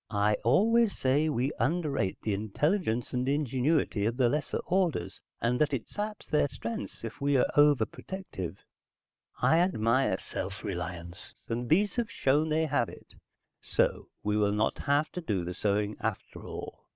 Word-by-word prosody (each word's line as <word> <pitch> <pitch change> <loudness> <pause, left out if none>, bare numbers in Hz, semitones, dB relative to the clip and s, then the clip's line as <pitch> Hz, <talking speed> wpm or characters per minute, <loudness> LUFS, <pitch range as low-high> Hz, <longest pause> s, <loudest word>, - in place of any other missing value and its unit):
"I 105 0 +2
always 225 - +4
say 140 +4 +2
we 135 -1 0
underrate 140 - 0
the 105 - 0
intelligence 120 - 0
and 125 +1 0
ingenuity 140 -5 +1
of 115 +2 -2
the 125 -3 +4
lesser 150 +3 -1
orders, 165 - 0 0.2
and 125 +3 0
that 150 -2 +3
it 120 - -5
saps 210 0 -5
their 150 -2 +2
strengths 105 -6 -6
if 115 +2 -7
we 140 0 +3
are - - +4
overprotective. 145 - +1 0.9
I 160 - +5
admire 130 - +2
self 95 +2 -6
reliance, 90 -2 -6
and 120 +1 -3
these 200 +8 +3
have 235 -2 0
shown 150 -2 +2
they 160 +1 +2
have 140 -6 +1
it. - - -14 0.5
So - - 0 0.2
we 105 0 +1
will 105 -1 +2
not 105 +1 0
have 145 +2 +1
to 180 - -5
do 100 - -1
the 90 - -4
sewing 105 +2 0
after 110 -3 -4
all. - - -8
125 Hz, 160 wpm, -29 LUFS, 105-155 Hz, 0.9 s, I